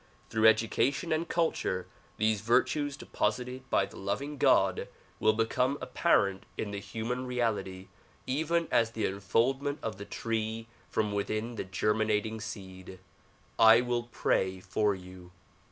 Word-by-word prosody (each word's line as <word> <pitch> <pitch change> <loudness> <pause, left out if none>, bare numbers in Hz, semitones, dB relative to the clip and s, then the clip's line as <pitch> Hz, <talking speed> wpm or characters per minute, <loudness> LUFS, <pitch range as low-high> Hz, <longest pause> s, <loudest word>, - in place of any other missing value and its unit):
Through 110 0 +4
education 115 - +2
and 160 +1 0
culture, 160 - 0 0.3
these 110 -1 +1
virtues 140 +6 +1
deposited 125 -1 -2
by 95 - +3
the - - -13
loving 135 +9 -3
God - - +3 0.3
will 110 - +4
become 125 +5 +1
apparent 100 - +1
in 105 - -3
the 100 - -4
human 115 +5 -4
reality 105 -6 -2 0.4
even 160 +5 0
as 115 0 +2
the 110 -2 -1
unfoldment 125 +9 0
of 110 -2 -4
the 100 - -6
tree 115 0 -3 0.2
from 105 -2 0
within 110 +3 -2
the 115 - -4
germinating 105 +2 0
seed. 95 -3 -8 0.6
I 115 +1 +8
will 120 -1 -2
pray 95 0 0
for 105 +2 0
you. 90 -1 -12
110 Hz, 135 wpm, -30 LUFS, 100-125 Hz, 0.6 s, I